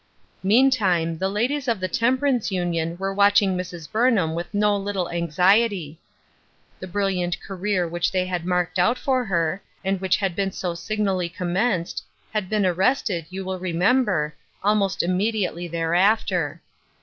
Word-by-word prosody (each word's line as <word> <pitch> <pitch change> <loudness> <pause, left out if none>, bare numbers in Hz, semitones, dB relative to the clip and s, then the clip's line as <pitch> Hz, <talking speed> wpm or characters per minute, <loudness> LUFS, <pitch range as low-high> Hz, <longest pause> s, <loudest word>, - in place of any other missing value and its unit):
Meantime, 195 -7 +3
the 190 - 0
ladies 250 +7 -1
of 230 -4 +1
the 185 - -1
Temperance 250 +4 +1
Union 170 -2 -1
were 195 +1 -2
watching 200 -1 +4
Mrs. 175 -3 -6
Burnham 215 -8 +2
with 170 +1 -5
no 210 0 +2
little 195 -3 -2
anxiety. 175 0 +2 0.8
The 185 - -7
brilliant 180 -2 -1
career 190 -2 -2
which 175 +1 -1
they 185 -1 0
had 180 -2 -3
marked 180 0 0
out 235 +8 +3
for 260 -2 0
her, 175 -1 0 0.2
and 190 -1 0
which 190 -1 +2
had 195 -4 -1
been 195 0 -1
so 180 -2 -3
signally 190 0 -1
com 175 0 -4
menced, 185 -4 0 0.3
had 210 -4 -2
been 210 -2 +1
arrested, 185 - +1
you 190 +1 -6
will 185 0 -3
remember, 180 -2 +1 0.3
almost 200 -1 +2
immediately 185 -1 -1
thereafter. 175 0 +1
190 Hz, 150 wpm, -23 LUFS, 175-210 Hz, 0.8 s, watching